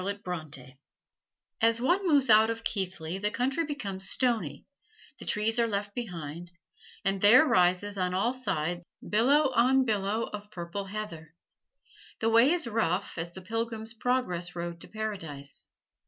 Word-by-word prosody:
As 230 Hz, 0 st, +4 dB
one 360 Hz, +10 st, +2 dB
moves 280 Hz, -7 st, +4 dB
out 220 Hz, +1 st, +7 dB
of 230 Hz, 0 st, -3 dB
Keighley 185 Hz, -4 st, -3 dB
the 205 Hz, +1 st, 0 dB
country 265 Hz, +9 st, 0 dB
becomes 195 Hz, -10 st, -4 dB
stony; 245 Hz, -4 st, 0 dB, 0.5 s
the -, -, -6 dB
trees 225 Hz, +2 st, +1 dB
are 230 Hz, -, +3 dB
left 205 Hz, -1 st, -3 dB
behind, 175 Hz, -7 st, -6 dB, 0.5 s
and 195 Hz, 0 st, +1 dB
there 240 Hz, +9 st, +8 dB
rises 185 Hz, -, +2 dB
on 180 Hz, 0 st, 0 dB
all 230 Hz, +7 st, +1 dB
sides 175 Hz, -9 st, -2 dB, 0.2 s
billow 265 Hz, +7 st, +4 dB
on 260 Hz, +2 st, +4 dB
billow 210 Hz, 0 st, 0 dB
of 210 Hz, -1 st, -7 dB
purple 180 Hz, 0 st, -5 dB
heather. 175 Hz, -6 st, -7 dB, 0.8 s
The 225 Hz, -, +1 dB
way 230 Hz, +4 st, +6 dB
is 350 Hz, -3 st, +1 dB
rough 210 Hz, -5 st, -1 dB
as 170 Hz, +1 st, -4 dB
the 190 Hz, -, -9 dB
Pilgrim's 225 Hz, +1 st, -3 dB
Progress 220 Hz, -8 st, -1 dB
road 170 Hz, -1 st, -5 dB
to -, -, -7 dB
Paradise. 165 Hz, -11 st, -5 dB
210 Hz, 140 wpm, -29 LUFS, 180-235 Hz, 0.8 s, there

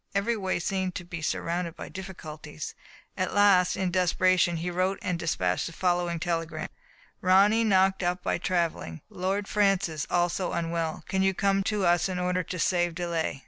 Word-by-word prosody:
Every 215 Hz, +4 st, +1 dB
way 190 Hz, -3 st, -1 dB
seemed 185 Hz, +1 st, -2 dB
to 175 Hz, -, -4 dB
be 165 Hz, -2 st, -6 dB
surrounded 170 Hz, +1 st, -2 dB
by -, -, -7 dB
difficulties. 155 Hz, -5 st, -8 dB, 0.4 s
At 185 Hz, 0 st, -2 dB
last, 195 Hz, -3 st, +5 dB
in 185 Hz, -2 st, 0 dB
desperation, 180 Hz, -1 st, +3 dB
he 175 Hz, +2 st, -3 dB
wrote 185 Hz, +2 st, 0 dB
and 180 Hz, -2 st, -1 dB
dispatched 90 Hz, -, 0 dB
the 165 Hz, -, -8 dB
following 175 Hz, -1 st, 0 dB
telegram: 165 Hz, -1 st, -2 dB, 0.5 s
Ronny 200 Hz, +5 st, +5 dB
knocked 190 Hz, -2 st, +3 dB
up 180 Hz, 0 st, -1 dB
by -, -, 0 dB
traveling; 170 Hz, -, -1 dB
Lord 195 Hz, +3 st, -2 dB
Francis 195 Hz, -7 st, +1 dB
also 175 Hz, +1 st, 0 dB
unwell; 165 Hz, -1 st, -2 dB
can 190 Hz, -, 0 dB
you 190 Hz, 0 st, +2 dB
come 195 Hz, 0 st, +2 dB
to 210 Hz, -3 st, 0 dB
us 175 Hz, +2 st, +3 dB
in 185 Hz, -, -3 dB
order 180 Hz, 0 st, 0 dB
to 180 Hz, +1 st, -6 dB
save 175 Hz, 0 st, +1 dB
delay 170 Hz, -5 st, -2 dB
180 Hz, 170 wpm, -27 LUFS, 170-190 Hz, 0.5 s, last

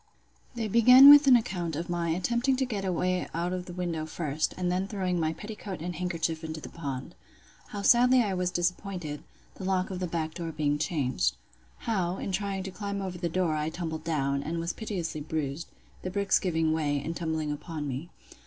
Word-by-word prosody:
They 230 Hz, -2 st, -2 dB
begin 250 Hz, +6 st, +9 dB
with 290 Hz, -1 st, +8 dB
an 260 Hz, -, +9 dB
account 175 Hz, -8 st, -1 dB
of 165 Hz, +3 st, -3 dB
'my 175 Hz, -1 st, -1 dB
attempting 235 Hz, +10 st, +1 dB
to 265 Hz, +1 st, 0 dB
get 210 Hz, -6 st, -3 dB
away 185 Hz, 0 st, 0 dB
out 175 Hz, +2 st, -1 dB
of 180 Hz, -1 st, -4 dB
the 175 Hz, -, -7 dB
window 170 Hz, -3 st, -3 dB
first, 155 Hz, -1 st, -2 dB
and 180 Hz, -1 st, 0 dB
then 185 Hz, +2 st, 0 dB
throwing 185 Hz, -3 st, -1 dB
my 160 Hz, -1 st, +1 dB
petticoat 205 Hz, +1 st, -7 dB
and 175 Hz, +2 st, -4 dB
handkerchief 165 Hz, -2 st, -2 dB
into 160 Hz, 0 st, -5 dB
the -, -, -9 dB
pond. 140 Hz, -5 st, -6 dB, 0.5 s
How 200 Hz, -1 st, -6 dB
sadly 250 Hz, +3 st, +6 dB
I 200 Hz, -3 st, -1 dB
was 180 Hz, -1 st, 0 dB
disappointed, 175 Hz, -3 st, -2 dB, 0.3 s
the -, -, -10 dB
lock 185 Hz, 0 st, 0 dB
of 185 Hz, -, -4 dB
the 180 Hz, -, -2 dB
back 160 Hz, -2 st, -3 dB
door 170 Hz, -2 st, -4 dB
being 150 Hz, -1 st, 0 dB
changed. 130 Hz, -, 0 dB, 0.5 s
How, 190 Hz, -5 st, -1 dB
in -, -, -4 dB
trying 195 Hz, 0 st, -2 dB
to 190 Hz, -, -6 dB
climb 200 Hz, +1 st, -4 dB
over 185 Hz, -2 st, -5 dB
the 170 Hz, -1 st, -1 dB
door, 175 Hz, -1 st, +1 dB
I 150 Hz, +1 st, -1 dB
tumbled 160 Hz, -1 st, -5 dB
down, 140 Hz, -4 st, 0 dB
and 160 Hz, +4 st, -3 dB
was 165 Hz, +1 st, -2 dB
piteously 175 Hz, -8 st, -4 dB
bruised; 150 Hz, 0 st, -3 dB, 0.3 s
the 185 Hz, -, -4 dB
bricks 200 Hz, +1 st, +2 dB
giving 160 Hz, -3 st, +1 dB
way, 145 Hz, -3 st, 0 dB
and 160 Hz, +4 st, -4 dB
tumbling 160 Hz, -3 st, -2 dB
upon 150 Hz, 0 st, -5 dB
me. 140 Hz, +6 st, -5 dB
175 Hz, 200 wpm, -28 LUFS, 160-190 Hz, 0.5 s, begin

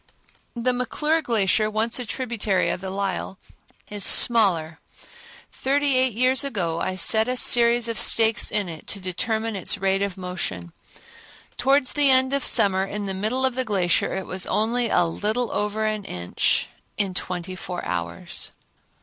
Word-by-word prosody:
The 245 Hz, +2 st, 0 dB
McClure 300 Hz, +6 st, -1 dB
Glacier, 215 Hz, -5 st, +1 dB
once 220 Hz, +3 st, -1 dB
a 245 Hz, -, -5 dB
tributary 220 Hz, -6 st, -1 dB
of -, -, -5 dB
the 190 Hz, -, -6 dB
Lyell, 195 Hz, 0 st, -4 dB, 0.5 s
is 205 Hz, -1 st, -2 dB
smaller. 185 Hz, -11 st, +4 dB, 0.7 s
Thirty 280 Hz, +1 st, 0 dB
eight 255 Hz, -2 st, +2 dB
years 255 Hz, +5 st, +2 dB
ago 180 Hz, -12 st, -3 dB
I 185 Hz, -, -2 dB
set 220 Hz, +5 st, +4 dB
a 255 Hz, 0 st, -2 dB
series 235 Hz, -1 st, +3 dB
of 230 Hz, -1 st, -2 dB
stakes 225 Hz, -1 st, +3 dB
in 205 Hz, -3 st, 0 dB
it 160 Hz, -2 st, -9 dB
to 200 Hz, -, -2 dB
determine 220 Hz, +4 st, -3 dB
its 190 Hz, -, +1 dB
rate 195 Hz, 0 st, 0 dB
of 200 Hz, -2 st, -3 dB
motion. 175 Hz, -, -5 dB, 0.8 s
Towards 270 Hz, +1 st, +1 dB
the 290 Hz, -2 st, +3 dB
end 260 Hz, 0 st, +4 dB
of 280 Hz, -, +1 dB
summer 190 Hz, -1 st, +3 dB
in 205 Hz, +1 st, -5 dB
the 195 Hz, -, -3 dB
middle 220 Hz, +7 st, -1 dB
of 260 Hz, -, 0 dB
the 260 Hz, +1 st, -2 dB
glacier 190 Hz, -7 st, 0 dB
it 190 Hz, -1 st, -4 dB
was 185 Hz, 0 st, -3 dB
only 235 Hz, +2 st, 0 dB
a 175 Hz, -, +2 dB
little 215 Hz, +7 st, -2 dB
over 210 Hz, +1 st, -2 dB
an 215 Hz, -2 st, -3 dB
inch 90 Hz, 0 st, -1 dB, 0.3 s
in 195 Hz, -3 st, 0 dB
twenty 180 Hz, 0 st, -5 dB
four 180 Hz, -1 st, -7 dB
hours. 85 Hz, -1 st, -5 dB
215 Hz, 165 wpm, -23 LUFS, 185-245 Hz, 0.8 s, smaller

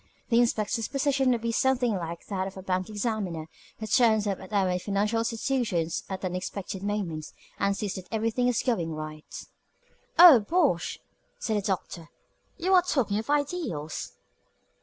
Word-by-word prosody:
The 235 Hz, -1 st, +4 dB
inspector's 225 Hz, -1 st, +1 dB
position 275 Hz, -1 st, +1 dB
would 240 Hz, -2 st, +1 dB
be 230 Hz, -, 0 dB
something 250 Hz, 0 st, +2 dB
like 170 Hz, -3 st, -5 dB
that 190 Hz, -2 st, -2 dB
of 195 Hz, -, -9 dB
the 190 Hz, -, -8 dB
bank 185 Hz, +1 st, -1 dB
examiner, 205 Hz, -7 st, -2 dB, 0.3 s
who 220 Hz, -, -5 dB
turns 220 Hz, -2 st, +3 dB
up 200 Hz, -2 st, -1 dB
at 190 Hz, +1 st, -11 dB
our 190 Hz, -3 st, +1 dB
financial 205 Hz, +4 st, 0 dB
institutions 225 Hz, -7 st, -1 dB
at 190 Hz, 0 st, -4 dB
unexpected 185 Hz, +1 st, -4 dB
moments, 195 Hz, -7 st, -3 dB, 0.3 s
and 200 Hz, 0 st, +1 dB
sees 205 Hz, -3 st, -2 dB
that 185 Hz, -2 st, -8 dB
everything 230 Hz, +2 st, 0 dB
is 245 Hz, -3 st, +1 dB
going 175 Hz, -11 st, -1 dB
right." 155 Hz, 0 st, -8 dB, 0.7 s
"Oh, 335 Hz, -7 st, +10 dB
bosh!" 275 Hz, -, +1 dB, 0.4 s
said 220 Hz, -2 st, -1 dB
the -, -, 0 dB
Doctor. 180 Hz, -4 st, -4 dB, 0.5 s
"You 370 Hz, +3 st, +1 dB
are 365 Hz, -, +7 dB
talking 250 Hz, -, 0 dB
of 225 Hz, -, -7 dB
ideals." 285 Hz, -, -2 dB
210 Hz, 160 wpm, -27 LUFS, 185-245 Hz, 0.7 s, Oh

